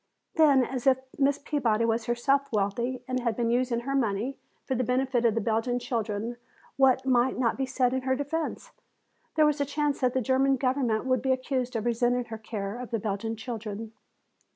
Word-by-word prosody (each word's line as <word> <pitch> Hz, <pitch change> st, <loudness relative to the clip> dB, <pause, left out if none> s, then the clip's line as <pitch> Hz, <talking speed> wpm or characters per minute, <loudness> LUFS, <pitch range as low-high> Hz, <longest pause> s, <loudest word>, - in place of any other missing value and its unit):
Then 285 Hz, -5 st, +5 dB
as 255 Hz, 0 st, -4 dB
this 265 Hz, -1 st, +5 dB, 0.2 s
Miss 280 Hz, 0 st, +3 dB
Peabody 235 Hz, -7 st, 0 dB
was 225 Hz, 0 st, 0 dB
herself 275 Hz, +4 st, +1 dB
wealthy 235 Hz, +5 st, -1 dB
and 255 Hz, 0 st, -1 dB
had 235 Hz, -3 st, -1 dB
been 235 Hz, 0 st, 0 dB
using 240 Hz, -1 st, +1 dB
her 275 Hz, +3 st, -3 dB
money 240 Hz, 0 st, 0 dB, 0.3 s
for -, -, -2 dB
the 255 Hz, 0 st, 0 dB
benefit 250 Hz, 0 st, +1 dB
of 225 Hz, -2 st, +3 dB
the 230 Hz, -, +1 dB
Belgian 225 Hz, +3 st, 0 dB
children, 230 Hz, -1 st, -3 dB, 0.4 s
what 265 Hz, -1 st, +4 dB
might 255 Hz, 0 st, +2 dB
not 240 Hz, -3 st, +1 dB
be 265 Hz, 0 st, -2 dB
said 255 Hz, -1 st, +1 dB
in 260 Hz, -, 0 dB
her 260 Hz, 0 st, +1 dB
defense? 320 Hz, -, -3 dB, 0.6 s
There 310 Hz, -1 st, +5 dB
was 300 Hz, -1 st, +1 dB
a -, -, +4 dB
chance 290 Hz, 0 st, -1 dB
that 255 Hz, -1 st, +1 dB
the -, -, +3 dB
German 265 Hz, +2 st, +3 dB
government 255 Hz, -3 st, 0 dB
would 255 Hz, -2 st, +1 dB
be 265 Hz, -, +1 dB
accused 255 Hz, -1 st, -1 dB
of 225 Hz, 0 st, -2 dB
resenting 240 Hz, +1 st, +1 dB
her 220 Hz, -, -5 dB
care 210 Hz, 0 st, -5 dB
of 250 Hz, -, -6 dB
the 230 Hz, -, 0 dB
Belgian 215 Hz, +1 st, -3 dB
children. 220 Hz, -1 st, -6 dB
250 Hz, 200 wpm, -28 LUFS, 230-265 Hz, 0.6 s, Then